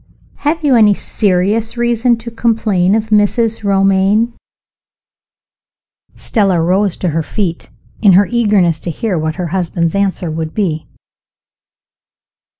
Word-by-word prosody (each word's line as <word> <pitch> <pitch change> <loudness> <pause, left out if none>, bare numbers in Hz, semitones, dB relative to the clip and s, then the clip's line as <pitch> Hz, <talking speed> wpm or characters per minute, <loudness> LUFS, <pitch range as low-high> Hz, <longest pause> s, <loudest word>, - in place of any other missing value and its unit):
Have 310 +2 -2
you 280 -4 +3
any 210 -3 +5
serious 210 +5 -1
reason 240 0 +1
to 230 +1 -9
complain 215 -5 +1
of 220 0 -2
Mrs. 215 +2 +1
Romayne?" 195 +3 +2 1.8
(Stella 195 -6 0
rose 185 +3 0
to 180 - -2
her 165 +1 -1
feet, 175 0 -4 0.3
in 200 -4 +5
her 195 +3 +5
eagerness 205 -9 +1
to - - -6
hear 205 +3 -3
what 155 0 -3
her 175 -2 -4
husband's 170 -3 -1
answer 195 -4 -1
would 160 0 -5
be.) 165 -7 -2
200 Hz, 125 wpm, -14 LUFS, 180-225 Hz, 1.8 s, any